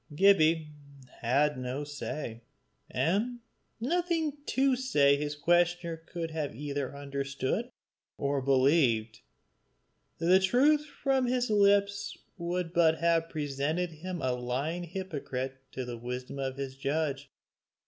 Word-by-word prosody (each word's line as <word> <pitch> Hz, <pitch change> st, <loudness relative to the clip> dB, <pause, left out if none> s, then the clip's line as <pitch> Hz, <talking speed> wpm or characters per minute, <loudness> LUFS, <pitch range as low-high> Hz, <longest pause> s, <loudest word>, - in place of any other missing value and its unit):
Gibbie 160 Hz, -4 st, +4 dB, 0.5 s
had 140 Hz, +4 st, +2 dB
no 130 Hz, +3 st, -3 dB
say 145 Hz, -5 st, -5 dB, 0.5 s
and 200 Hz, -, 0 dB, 0.4 s
nothing 330 Hz, +2 st, 0 dB
to 265 Hz, 0 st, +3 dB
say 145 Hz, -, +3 dB
that 140 Hz, -, -4 dB
his 150 Hz, 0 st, -2 dB
questioner 175 Hz, +2 st, +2 dB
could 165 Hz, 0 st, -6 dB
either 145 Hz, -2 st, -3 dB
have 140 Hz, -, -10 dB
understood 140 Hz, -, -2 dB, 0.5 s
or 140 Hz, 0 st, 0 dB
believed; 130 Hz, -4 st, +3 dB, 1.0 s
the 175 Hz, +3 st, +5 dB
truth 285 Hz, +10 st, +3 dB
from 270 Hz, -3 st, 0 dB
his 245 Hz, -2 st, 0 dB
lips 200 Hz, -1 st, +3 dB, 0.2 s
would 175 Hz, -1 st, -3 dB
but 160 Hz, -2 st, +4 dB
have 165 Hz, 0 st, +2 dB
presented 155 Hz, +3 st, -1 dB
him 175 Hz, +1 st, -6 dB
a 130 Hz, -, +2 dB
lying 135 Hz, +8 st, -2 dB
hypocrite 140 Hz, -7 st, -5 dB
to 130 Hz, -, -4 dB
the 120 Hz, -1 st, -6 dB
wisdom 125 Hz, +3 st, -5 dB
of 135 Hz, -1 st, -3 dB
his 135 Hz, -1 st, -4 dB
judge. 140 Hz, 0 st, -2 dB
155 Hz, 120 wpm, -30 LUFS, 135-185 Hz, 1.0 s, the